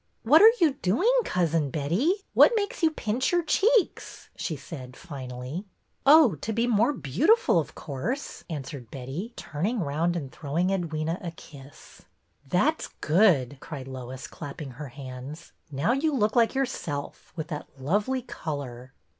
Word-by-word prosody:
"What 295 - +7
are 440 +2 +10
you 315 -5 +4
doing. 245 - +3
Cousin 165 -4 +1
Betty? 170 - +1 0.2
What - - +7
makes 405 -3 -2
you 325 - +5
pinch 245 -4 -1
your 350 -1 +2
cheeks? 435 +6 +1
" - - -42
she - - -3
said, 130 -6 -9
finally. 135 0 -6 0.2
" - - -45
Oh, 295 - +8
to 215 - -4
be 230 +2 +1
more 235 +2 +3
beautiful, 290 - +3
of 155 -1 -5
course," 190 - -4
an 150 -4 -4
swered 130 -5 -9
Betty, 135 - -6
turning 200 +11 -2
round 165 +2 0
and 140 -6 -4
throwing 165 +5 -1
Edwyna 165 -2 -2
a 175 - -3
kiss. 145 -4 -14 0.2
" 140 - -30
That 285 - +2
's - - -4
good," 155 - +3
cried 135 -3 -8
Lois, 130 0 -7
clapping 145 -2 -8
her 145 +4 -8
hands. 130 +3 -9
" - - -47
Now 140 - +1
you 285 +3 +1
look 215 -3 +1
like 235 +1 +3
yourself, 170 - -3
with 160 -1 -5
that 150 -3 -5
lovely 205 - 0
color." 135 - -6
165 Hz, 165 wpm, -27 LUFS, -, 0.2 s, are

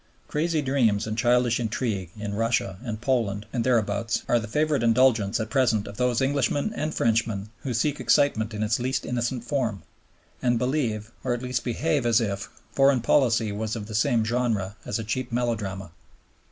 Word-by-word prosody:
Crazy 155 0 0
dreams 120 -6 +2
and 110 0 -3
childish 120 0 +2
intrigue 110 -5 -2
in 105 -1 -4
Russia 110 -4 0
and 110 -4 -4
Poland 115 -5 0
and 120 -3 0
thereabouts 115 -2 +1
are 120 - +3
the 115 - -6
favorite 150 +5 +1
indulgence 115 -3 +3
at 110 0 -4
present 120 -7 +2
of 100 0 -9
those 125 0 +1
Englishmen 145 - 0
and 155 -7 -2
Frenchmen 110 -3 0
who 135 - -3
seek 140 +5 0
excitement 115 -2 +2
in 105 0 -3
its 110 +2 +1
least 130 +2 -1
innocent 120 0 -2
form, 120 -6 -2 0.6
and 120 -1 +2
believe, 115 -4 -1
or 125 -2 0
at 120 - -7
least 125 -1 -2
behave 140 +2 0
as 115 0 +4
if 100 -3 -3 0.2
foreign 135 -2 +4
policy 115 -4 +3
was 110 +2 -3
of 110 -3 -5
the 110 - -9
same 115 +1 +2
genre 110 -4 -1
as - - -1
a 115 - -4
cheap 120 +4 -3
melodrama. 105 -6 -2
115 Hz, 180 wpm, -25 LUFS, 110-130 Hz, 0.6 s, as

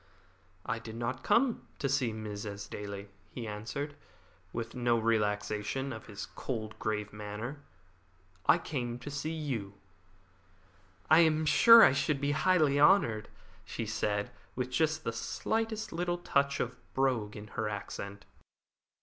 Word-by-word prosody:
"I 115 - -2
did 115 -1 -8
not 120 +3 -3
come 235 +3 +2
to 140 - -1
see 135 -3 +1
Mrs. 105 -1 -5 0.2
Esdaile," 100 -1 -6 0.2
he 115 +7 -6
answered, 115 +8 -4 0.6
with 115 -1 -4
no 120 -2 +2
relaxation 110 +3 0
of 110 - -9
his 105 -1 -6
cold 110 -4 -5
and 110 - -17
grave 105 -1 -2
manner; 105 +7 -6 0.9
"I - - +7
came 125 -8 -3
to 145 +4 -8
see 145 +2 -3
you." 130 -11 -3 1.3
"I 160 - +7
am 160 -1 +4
sure 230 +9 +9
I - - +8
should 135 +1 +1
be 140 +1 0
highly 155 -2 +3
honoured," 145 - +4 0.3
she - - -4
said, 105 -1 -1 0.2
with 125 0 -2
just 155 +3 +1
the 115 - -2
slightest 220 - -2
little 175 +1 -1
touch 140 -5 +1
of 125 +1 -2 0.2
brogue 125 -6 +1
in 105 +1 -9
her 110 0 -2
accent. 100 -1 -6
120 Hz, 140 wpm, -31 LUFS, 105-150 Hz, 1.3 s, sure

